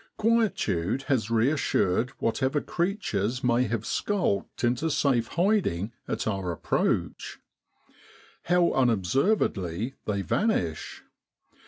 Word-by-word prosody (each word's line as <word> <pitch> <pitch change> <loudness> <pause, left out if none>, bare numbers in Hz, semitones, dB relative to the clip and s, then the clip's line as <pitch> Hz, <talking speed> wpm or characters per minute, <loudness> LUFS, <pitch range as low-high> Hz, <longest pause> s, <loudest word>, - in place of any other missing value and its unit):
Quietude 195 - +1
has 130 -5 0
reassured 115 -3 +1
whatever 130 +5 0
creatures 130 - -2
may 125 0 +3
have 115 -1 -2
skulked 180 - -1
into 120 +7 +1
safe 130 -6 +1
hiding 170 - +1 0.2
at - - -2
our 95 -4 -2
approach. 85 - -1 1.1
How 175 0 +3
unobservedly 115 - +1
they 100 -2 -1
vanish 90 - -1
120 Hz, 95 wpm, -27 LUFS, 100-165 Hz, 1.1 s, may